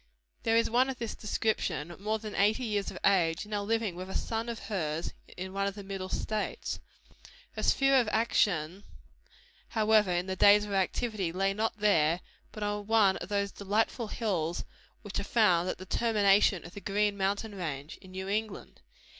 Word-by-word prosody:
There 225 0 +2
is 230 - +3
one 250 +3 +3
of 265 - -4
this 230 -3 -4
description, 175 -7 -2
more 215 +2 -1
than 215 -1 -7
eighty 210 +5 +2
years 210 -4 -1
of - - -8
age, 170 -4 +3
now 210 -1 -2
living 220 -2 -1
with 185 +1 -7
a - - -6
son 225 +1 -2
of 235 - -3
hers 165 -6 -2 0.2
in 185 +1 -5
one 200 0 0
of 200 - -3
the 205 - -8
Middle 195 -1 -5
States. 215 +2 -3 0.7
Her - - -6
sphere 270 0 +3
of 245 -4 +3
action, 200 -5 +1 0.8
however, 215 -2 +3
in 175 0 0
the 190 0 -3
days 205 +2 +6
of 210 - -6
her - - 0
activity, 195 -1 0
lay 195 +2 +1
not 220 +2 -1
there, 175 -5 +3 0.3
but 215 - -6
on 205 0 -2
one 215 -4 +4
of 175 - -7
those 200 -1 0
delightful 215 +3 -1
hills 175 -8 -2 0.4
which 205 -2 -4
are - - -2
found 185 -5 +3
at - - -3
the 185 - -9
termination 205 -3 +3
of 175 - -10
the 205 - -8
Green 205 +1 +1
Mountain 200 +2 -1
range, 155 -5 -5
in 190 - -14
New 190 +1 -6
England. 210 0 -4
200 Hz, 190 wpm, -30 LUFS, 185-220 Hz, 0.8 s, days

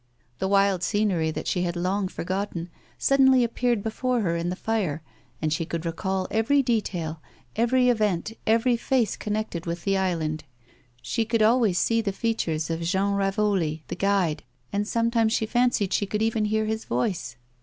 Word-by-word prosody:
The 190 - 0
wild 195 -2 +3
scenery 190 -5 +1
that 155 - -4
she 180 - 0
had 175 -1 -1
long 185 +3 0
forgotten 185 -1 -4 0.3
suddenly 265 -2 +4
appeared 235 -2 0
before 245 +2 -1
hor 170 -5 0
in 170 +1 -1
the 180 - -2
fire, 185 -8 -2 0.4
and 155 -1 0
she 160 - -1
could 165 0 -4
recall 185 +3 -2
every 270 +6 +3
detail, 175 - -2 0.3
every 250 +2 +3
event, 215 -4 +1
every 230 +3 +3
face 240 -2 +1
connected 210 -5 -3
with 170 0 -3
the 195 -1 +1
island. 160 -4 -1 0.6
She 230 - 0
could 225 0 +1
always 220 -4 +3
see 230 +4 +2
the 205 -3 -1
features 165 -8 -1
of 165 +1 -2
Jean 190 +4 +1
Ravoli, 195 -5 0
the - - -3
guide, 190 -5 +1 0.3
and 205 +1 0
sometimes 230 -1 +1
she 225 - +1
fancied 240 -4 +1
she 205 - +1
could 210 +2 -1
even 220 -1 +1
hear 215 +1 +1
his 220 +1 -3
voice. 125 - -2
200 Hz, 170 wpm, -25 LUFS, 175-225 Hz, 0.6 s, suddenly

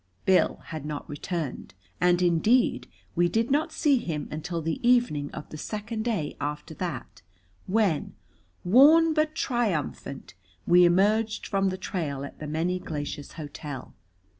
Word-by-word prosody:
Bill 190 -1 +3
had 155 -3 -6
not 150 -1 -5
returned, 145 - -5 0.2
and, 180 0 +3
indeed, 195 +9 +3 0.3
we 175 0 +3
did 225 +6 0
not 310 +3 +1
see 295 -4 +2
him 155 -8 -4
until 165 +3 -4
the 165 - -2
evening 240 - +2
of 150 - -8
the 155 - -8
second 220 +3 -4
day 205 -11 -1
after 150 +2 -4
that, 155 - -6 0.5
when, 190 -7 +1 0.5
worn 305 - +6
but 310 0 +1
triumphant, 170 - -2 0.3
we 175 +1 +6
emerged 210 +5 +2
from 195 -1 +1
the 185 - -4
trail 145 -8 -3
at - - -11
the 150 - -6
Many 170 +4 -1
Glaciers 145 -4 -5
Hotel. 145 -3 -7
175 Hz, 140 wpm, -27 LUFS, 150-225 Hz, 0.5 s, worn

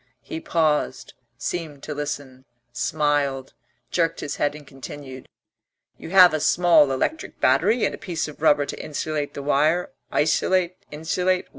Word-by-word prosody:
He 325 - -6
paused, 160 - 0 0.2
seemed 160 -5 -5
to 150 - -5
listen, 145 -3 -5 0.3
smiled, 140 0 0 0.4
jerked 165 -2 0
his 145 - -4
head 145 0 0
and 150 -1 -11
continued: 135 -1 -10 0.7
"You - - -8
have 180 -2 +7
a 155 - 0
small 170 -3 +4
electric 305 - -2
battery 235 0 +3
and - - -1
a - - -8
piece 170 -4 -3
of 150 -1 -11
rubber 145 -2 +4
to - - -6
insulate 150 -1 -3
the 140 - -5
wire 155 +5 +2 0.2
isolate? 180 +3 +2
insulate? 180 +4 -1
150 Hz, 145 wpm, -23 LUFS, 145-175 Hz, 0.7 s, have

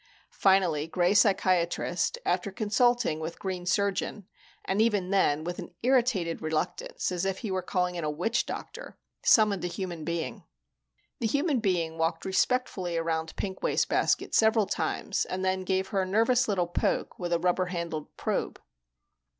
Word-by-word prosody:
Finally 180 -6 +3
Gray 175 +3 +2
Psychiatrist 185 - +2
after 200 - 0
consulting 225 -3 +1
with 160 +1 -5
Green 185 -2 -4
Surgeon, 200 +1 -1 0.4
and 195 +3 +1
even 205 -5 +1
then 155 -6 +2
with 175 +1 -4
an - - -9
irritated 240 -10 +2
reluctance, 155 +3 -2
as 180 0 -2
if 195 0 -1
he 205 - -2
were 190 0 0
calling 180 0 -1
in 170 -2 -4
a 155 - 0
witch 180 +11 -1
doctor - - -7 0.3
summoned 210 -4 +4
a - - 0
human 175 -3 -5
being. 170 0 -3 0.8
The 230 - 0
human 285 +3 +1
being 170 -6 -1
walked 165 +1 -1
respectfully 190 -3 0
around 160 -1 -2
Pink 190 -2 -4
Wastebasket - - +1
several 220 -1 +4
times - - -1
and 185 +1 -3
then 190 0 +1
gave 190 0 -1
her 195 -3 0
a - - 0
nervous 230 +5 +3
little 190 -4 +1
poke 175 - -1
with 175 -2 -3
a 170 - +3
rubber 180 +1 +1
handled 170 -4 -5
probe. - - -2
185 Hz, 160 wpm, -28 LUFS, 170-205 Hz, 0.8 s, summoned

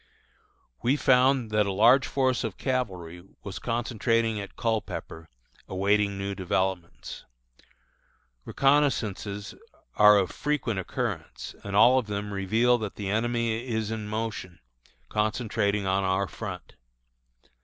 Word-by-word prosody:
We 125 +4 +2
found 130 -3 +3
that 105 -1 +2
a - - 0
large 120 +7 +5
force 130 -3 +1
of 110 -5 -4
cavalry 90 -10 -3 0.2
was 95 -2 -6
concentrating 115 -1 0
at 100 -1 -8
Culpepper, 110 -7 -3 0.4
awaiting 100 +1 +1
new 100 0 -3
developments. 95 -2 -3 1.2
Reconnoissances 115 -8 +1 0.4
are 105 0 +7
of 95 -2 +1
frequent 135 -8 -1
occurrence, 95 - -4
and 100 -1 -4
all 125 +5 +6
of 120 - -5
them 105 0 -4
reveal 110 +6 +2
that 105 -2 -5
the 100 -2 -4
enemy 115 +1 -1
is 110 -2 -2
in 110 -2 -4
motion, 105 -5 -4 0.5
concentrating 105 - 0
on 95 +1 +1
our 95 +1 +1
front. 95 -6 -7
105 Hz, 120 wpm, -27 LUFS, 100-120 Hz, 1.2 s, are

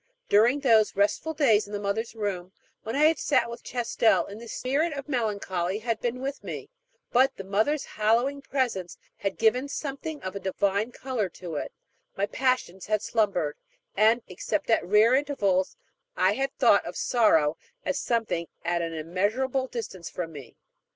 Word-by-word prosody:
During 235 +7 +4
those 225 -6 +4
restful 210 +11 +1
days 225 -9 +3
in 205 - -10
the 205 - -2
Mother's 215 +3 -2
Room, 190 -4 -3 0.3
when 225 - -4
I 290 - +3
had 315 +1 +4
sat 260 -4 +2
with 235 - -8
Chastel, 230 -6 +1
this 225 +1 -8
spirit 295 +6 0
of 280 0 -6
melancholy 200 -7 -1
had 225 0 -2
been 245 +1 -2
with 275 +1 -4
me; - - -7 0.4
but 260 +3 +4
the 195 - -6
mother's 215 +10 0
hallowing 235 +6 +1
presence 245 -11 -2 0.2
had 195 -1 -3
given 245 +5 +2
something 290 +2 -5
of 185 +1 -5
a - - -3
divine 200 +4 0
color 245 -7 -2
to 175 -1 -8
it, - - -4 0.5
my 200 - +2
passions 235 -5 -1
had 215 -1 0
slumbered, 185 -9 0 0.4
and, 225 +2 +4
except 230 - -2
at - - +3
rare 210 +5 +5
intervals, 210 -10 +1 0.4
I 185 +1 +4
had 270 +4 -2
thought - - +5
of - - -7
sorrow 160 -11 +3 0.3
as - - 0
of - - -3
something 225 -8 -1 0.2
at 170 0 +1
an 165 -1 -3
immeasurable 215 - -1
distance 225 -8 -6
from 170 -2 -5
me. 140 -6 -11
220 Hz, 170 wpm, -27 LUFS, 190-260 Hz, 0.5 s, rare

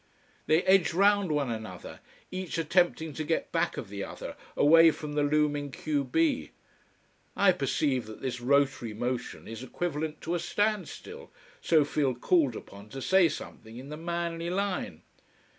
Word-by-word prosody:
They 160 +3 +4
edge 190 -3 +4
round 200 -1 +4
one 145 -4 0
another, 110 -5 -7 0.3
each 185 -2 -4
attempting 165 -1 +1
to 155 - -3
get 160 +2 -1
back - - 0
of - - -6
the 100 0 -5
other, - - -7 0.2
away 165 +3 +7
from 150 -1 -5
the 145 - +1
looming 145 -1 +1
q 145 +1 -1
b. 135 - +1 0.9
I - - +6
perceive 130 -6 0
that 110 - -9
this 125 -2 -4
rotary 135 -4 +1
motion 125 +2 -4
is 115 +1 -7
equivalent 155 +3 -3
to 165 - -3
a 175 - 0
standstill, 215 - -2 0.3
so 155 -3 +4
feel 140 -3 0
called 140 -1 +2
upon 100 +1 -11
to 135 - -7
say 185 +4 +4
something 115 -6 -8
in 130 +3 -9
the 150 - -5
manly 170 +1 -3
line. 185 - -2
150 Hz, 160 wpm, -29 LUFS, 130-170 Hz, 0.9 s, away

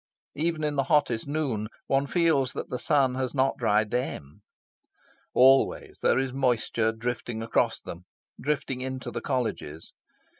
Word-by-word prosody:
Even 160 +1 -1
in 150 -1 0
hottest 135 -4 +2
noon, 140 -8 -1 0.2
one 135 +1 +1
feels 160 -7 +2
that - - -6
the 125 - -2
sun 140 -5 +2
has 130 +1 -3
not 135 0 +2
dried 105 0 +2
THEM. 105 - -4 0.9
Always 135 +1 +4
there - - +3
is 130 -1 -1
moisture 120 -4 +1
drifting 115 0 -4
across 115 - +1
them, 85 +1 -9 0.4
drifting 135 -2 -2
into 130 0 -4
the - - -4
Colleges. 110 - -3
130 Hz, 140 wpm, -27 LUFS, 115-140 Hz, 0.9 s, Always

